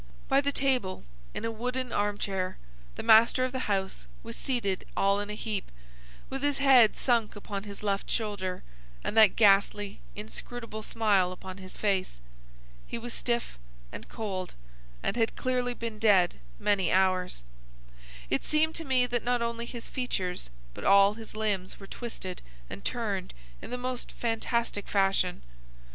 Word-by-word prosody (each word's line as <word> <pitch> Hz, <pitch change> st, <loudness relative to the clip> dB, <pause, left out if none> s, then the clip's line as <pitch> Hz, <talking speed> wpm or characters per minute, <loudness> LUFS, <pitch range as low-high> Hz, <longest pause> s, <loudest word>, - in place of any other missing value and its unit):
By 275 Hz, -, +4 dB
the 285 Hz, 0 st, 0 dB
table, 260 Hz, -9 st, 0 dB, 0.3 s
in -, -, -3 dB
a 230 Hz, -, -1 dB
wooden 250 Hz, +2 st, -3 dB
arm 205 Hz, 0 st, 0 dB
chair, 190 Hz, -3 st, -2 dB, 0.4 s
the -, -, -5 dB
master 235 Hz, +3 st, +6 dB
of 255 Hz, -, -3 dB
the 260 Hz, -3 st, -3 dB
house 190 Hz, -, -1 dB, 0.2 s
was 115 Hz, -, -7 dB
seated 215 Hz, -8 st, -1 dB
all 200 Hz, +1 st, +3 dB
in 205 Hz, 0 st, -4 dB
a 210 Hz, -, -3 dB
heap, 210 Hz, -2 st, -3 dB, 0.6 s
with 270 Hz, 0 st, -4 dB
his 290 Hz, -1 st, +1 dB
head 260 Hz, -6 st, +6 dB
sunk 235 Hz, -4 st, +1 dB
upon 205 Hz, -1 st, -5 dB
his 200 Hz, 0 st, -8 dB
left 200 Hz, -1 st, -1 dB
shoulder, 200 Hz, -5 st, -2 dB, 0.4 s
and -, -, -2 dB
that 215 Hz, -4 st, +7 dB
ghastly, 205 Hz, -1 st, +4 dB, 0.2 s
inscrutable 220 Hz, +1 st, -6 dB
smile 205 Hz, -5 st, +2 dB
upon 185 Hz, +1 st, -8 dB
his 185 Hz, -1 st, -10 dB
face. 190 Hz, -, 0 dB, 0.7 s
He -, -, -4 dB
was 235 Hz, 0 st, -6 dB
stiff 235 Hz, -, -2 dB, 0.3 s
and -, -, -9 dB
cold, 190 Hz, -4 st, -4 dB, 0.5 s
and -, -, 0 dB
had 225 Hz, -2 st, +1 dB
clearly 250 Hz, -1 st, 0 dB
been 230 Hz, -2 st, -5 dB
dead 195 Hz, -, +4 dB, 0.2 s
many 195 Hz, -4 st, +2 dB
hours. 185 Hz, -, +2 dB, 0.8 s
It -, -, 0 dB
seemed 315 Hz, +1 st, +2 dB
to 330 Hz, -, -4 dB
me 260 Hz, -4 st, +3 dB
that 240 Hz, -1 st, -1 dB
not 245 Hz, -1 st, +1 dB
only 235 Hz, 0 st, -3 dB
his 235 Hz, -1 st, -8 dB
features 185 Hz, -, -3 dB, 0.2 s
but -, -, -8 dB
all 200 Hz, +1 st, +6 dB
his 220 Hz, 0 st, -10 dB
limbs 205 Hz, -4 st, -1 dB
were 195 Hz, -, -9 dB
twisted 195 Hz, -5 st, -6 dB, 0.3 s
and -, -, -7 dB
turned -, -, -2 dB, 0.3 s
in -, -, -8 dB
the 250 Hz, -, -2 dB
most 250 Hz, 0 st, -4 dB
fantastic 230 Hz, -2 st, -1 dB
fashion. 195 Hz, -2 st, +1 dB
215 Hz, 160 wpm, -29 LUFS, 195-245 Hz, 0.8 s, that